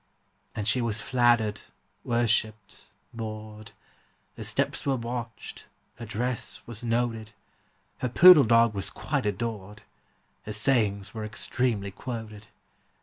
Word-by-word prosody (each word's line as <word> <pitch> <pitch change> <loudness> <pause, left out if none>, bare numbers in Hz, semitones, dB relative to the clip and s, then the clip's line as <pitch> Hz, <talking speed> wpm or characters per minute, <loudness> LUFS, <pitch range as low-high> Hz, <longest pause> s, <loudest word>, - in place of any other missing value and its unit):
And 105 -1 -3
she 120 +4 +2
was 115 -2 -1
flattered, 115 -3 +2 0.4
worshipped, 110 -3 -1 0.3
bored; 110 -1 -7 0.6
Her - - -7
steps - - 0
were 135 -1 +1
watched, 120 -1 -6 0.3
her 115 0 -8
dress 120 +2 -2
was 120 0 -7
noted; 115 -2 -1 0.7
Her 125 - -1
poodle 170 +2 +8
dog 115 0 +4
was 100 -2 -1
quite - - -2
adored; 105 -1 -4 0.6
Her 105 - -4
sayings 105 -3 +1
were 110 -1 -5
extremely 105 -1 -2
quoted. 110 -1 -7
115 Hz, 115 wpm, -27 LUFS, 105-120 Hz, 0.7 s, poodle